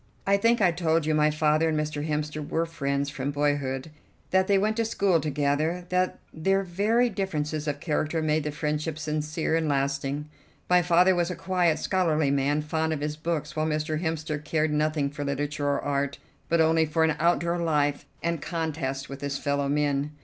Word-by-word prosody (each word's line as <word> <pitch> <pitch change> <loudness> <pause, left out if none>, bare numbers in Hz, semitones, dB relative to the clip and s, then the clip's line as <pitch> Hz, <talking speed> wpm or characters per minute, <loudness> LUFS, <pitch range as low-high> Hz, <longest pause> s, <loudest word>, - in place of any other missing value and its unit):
I 200 - +4
think 230 +3 +3
I 180 -3 +5
told 165 -2 +1
you 155 - +1
my 150 0 +4
father 155 +1 +2
and 155 -1 0
Mr. 150 -1 -2
Hemster 150 0 -2
were 165 +1 +1
friends 140 -3 -2
from 135 -1 -3
boyhood; 145 -1 -1 0.4
that 190 0 +3
they 200 - +4
went 215 +3 +1
to 230 - +2
school 200 -6 +2
together; 150 +4 0
that 180 0 +1 0.2
their 195 +5 +1
very 210 +7 +2
differences 155 -8 -2
of 145 -1 -2
character 155 +1 -1
made 155 0 +1
the 150 - -2
friendship 150 +1 -2
sincere 155 +1 -1
and 160 -2 0
lasting. 140 +1 -1 0.4
My 180 0 +5
father 175 +2 +4
was 175 -1 0
a 180 - -3
quiet, 180 -4 +1
scholarly 160 -6 +1
man, 140 +2 +1
fond 160 +1 -1
of 150 - -4
his 150 0 -2
books, 155 -1 -3
while 155 0 0
Mr. 155 0 -1
Hemster 160 -2 -2
cared 155 0 0
nothing 150 -2 0
for 145 0 -5
literature 145 +1 -2
or 140 - +1
art, 140 -1 -1 0.3
but 170 - +3
only 160 0 +4
for 160 +2 +1
an 160 -1 +2
outdoor 170 +1 +2
life 145 -4 0 0.2
and 170 -2 -1
contest 150 -5 -3
with 135 0 -8
his 140 -1 -2
fellow 140 -1 -1
men. 145 0 0
155 Hz, 190 wpm, -26 LUFS, 145-170 Hz, 0.4 s, I